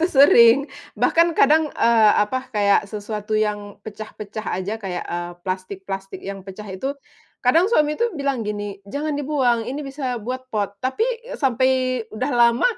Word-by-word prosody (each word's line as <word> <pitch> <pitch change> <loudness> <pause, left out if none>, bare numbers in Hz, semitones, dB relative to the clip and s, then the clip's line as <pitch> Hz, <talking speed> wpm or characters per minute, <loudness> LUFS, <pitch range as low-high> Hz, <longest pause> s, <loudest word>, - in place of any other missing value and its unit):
itu 335 - +3
sering 275 -4 +6 0.3
bahkan, 335 0 +3
eee, 270 -8 +4
apa 260 +5 -3
kadang 205 -1 +3
sesuatu 210 +1 -5
yang 205 -1 -1
pecah-pecah 215 -1 -8
aja, 190 +3 -3
kayak, 185 -4 -4
eee, 175 0 -4
plastik-plastik 195 +1 -5
yang 195 -1 -7
pecah 195 +2 -9
itu 265 +10 -3 0.5
kadang 330 +10 +4
suami 300 -10 +3
itu 470 +10 0
bilang 275 -3 -1
gini, 205 -2 -4
"Jangan 295 +7 -3
dibuang, 260 -6 +1
ini 285 +3 -4
bisa 270 -2 -4
buat 255 +3 -6
pot." 200 -3 -3
tapi 260 +12 0 0.3
sampai 260 -1 +1
udah 255 +6 -3
lama 235 0 +4
230 Hz, 145 wpm, -22 LUFS, 205-270 Hz, 0.5 s, sering